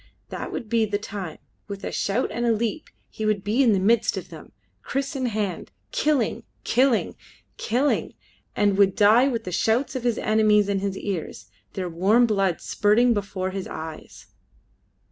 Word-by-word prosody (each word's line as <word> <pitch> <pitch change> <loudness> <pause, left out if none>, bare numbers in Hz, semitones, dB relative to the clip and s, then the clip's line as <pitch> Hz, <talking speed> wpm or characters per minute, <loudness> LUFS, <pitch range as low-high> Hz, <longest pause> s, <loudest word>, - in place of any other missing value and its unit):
That - - -6
would 230 - -5
be 225 0 +2
the 205 -1 -1
time: 200 -5 -7 0.3
with 200 -1 -7
a - - -3
shout 230 +6 -1
and 240 - -3
a 235 - +3
leap 230 +7 -2 0.2
he 220 - -7
would 215 -2 0
be 215 +6 +1
in 245 -4 +5
the 195 - +2
midst 220 +2 +2
of 185 - -6
them, 160 -2 -12 0.3
kriss 275 - -3
in 260 -2 -1
hand, 205 -6 -3 0.2
killing, 290 -7 0 0.2
killing, 250 -1 +2 0.4
killing, 255 +6 0 0.4
and 205 -1 +2
would 195 -1 +4
die 220 +5 +5
with 240 -4 -2
the 180 - -6
shouts 230 +9 0
of 255 - -3
his 240 -2 +1
enemies 215 -1 +3
in 200 -1 +1
his 195 0 -3
ears, 180 - -5 0.2
their 185 -1 -3
warm 195 +8 +3
blood 195 -5 0
spurting 230 +4 +3
before 195 -3 -3
his 195 0 -5
eyes. 160 -1 -8
210 Hz, 175 wpm, -24 LUFS, 195-235 Hz, 0.4 s, in